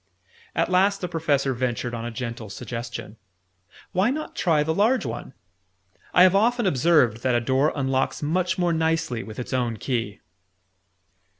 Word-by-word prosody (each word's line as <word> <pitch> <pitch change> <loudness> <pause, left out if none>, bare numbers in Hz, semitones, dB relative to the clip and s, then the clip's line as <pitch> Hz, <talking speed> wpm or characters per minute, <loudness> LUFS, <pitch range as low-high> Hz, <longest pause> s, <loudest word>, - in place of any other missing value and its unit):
At 165 +2 +1
last 195 +2 +3
the 180 - -2
Professor 145 -5 0
ventured 120 -1 -2
on 115 0 -4
a - - -3
gentle 115 -1 -6
suggestion. 115 +1 -6 0.7
"Why 190 +4 +2
not 305 +4 -4
try 155 -4 +2
the 160 +1 0
large 225 - +2
one? 120 +2 -6 0.8
I 180 - +6
have 185 0 +6
often 235 +3 +2
observed 140 - +3
that 125 -1 +1
a - - +4
door 130 +5 +2
unlocks 135 0 -1
much 180 +5 0
more 175 -2 +1
nicely 160 -7 0
with 110 -2 -9
its 125 - -5
own 120 -3 0
key." 115 -4 -3
140 Hz, 160 wpm, -24 LUFS, 120-180 Hz, 0.8 s, I